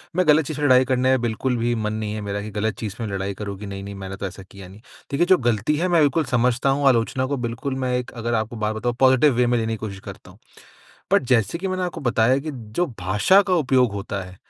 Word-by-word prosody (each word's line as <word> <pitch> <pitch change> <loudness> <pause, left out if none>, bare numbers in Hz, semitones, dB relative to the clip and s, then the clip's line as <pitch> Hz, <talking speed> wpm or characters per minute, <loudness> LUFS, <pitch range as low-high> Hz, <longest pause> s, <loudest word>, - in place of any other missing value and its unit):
मैं 180 -2 +1
गलत 150 0 +5
चीज़ 145 +1 -5
से 150 - -3
लड़ाई 130 -1 +5
करने 130 0 +1
में 130 -2 +3
बिल्कुल 120 +2 -1
भी 120 +1 0
मन 110 -1 -2
नहीं 110 -1 -3
है 110 - -4
मेरा 100 0 -4
कि 105 - -6
गलत 105 +2 -2
चीज़ 105 -3 -5
पे 115 - -4
लड़ाई 100 -1 -3
करूँ 100 0 -6
कि 105 - -7
नहीं-नहीं 100 0 -7
मैंने 95 0 -7
तो 100 - -5
ऐसा 95 +1 -10
किया 95 0 -13
नहीं। 95 +3 -14 0.3
देखिए, 145 +5 +2
जो 185 +1 +5
गलती 120 +2 0
है 175 +4 0
मैं 170 -3 +3
बिल्कुल 150 +2 +2
समझता 125 +1 +1
हूँ, 140 +1 +2
आलोचना 125 +1 +2
को 140 +2 -2
बिल्कुल 120 +2 -4
मैं 125 - -1
एक 125 - -5
अगर 120 0 -4
आपको 110 +1 -2
बात 110 0 -2
बताऊँ 120 +2 -2
पॉज़िटिव 130 +2 +5
वे 125 0 +2
में 120 0 +2
लेने 115 -1 -1
की - - -4
कोशिश 100 -2 -7
करता - - -12
हूँ। - - -19 0.8
बट - - +5
जैसे 115 - +2
कि 190 +2 -3
मैंने 185 0 -2
आपको 180 -1 -4
बताया 120 0 +2
कि 155 +3 -5
जो 120 +6 -3
भाषा 105 - +4
का 185 - +3
उपयोग 130 - +2
होता 100 0 -4
है, 90 0 -12
120 Hz, 265 wpm, -22 LUFS, 105-135 Hz, 0.8 s, गलत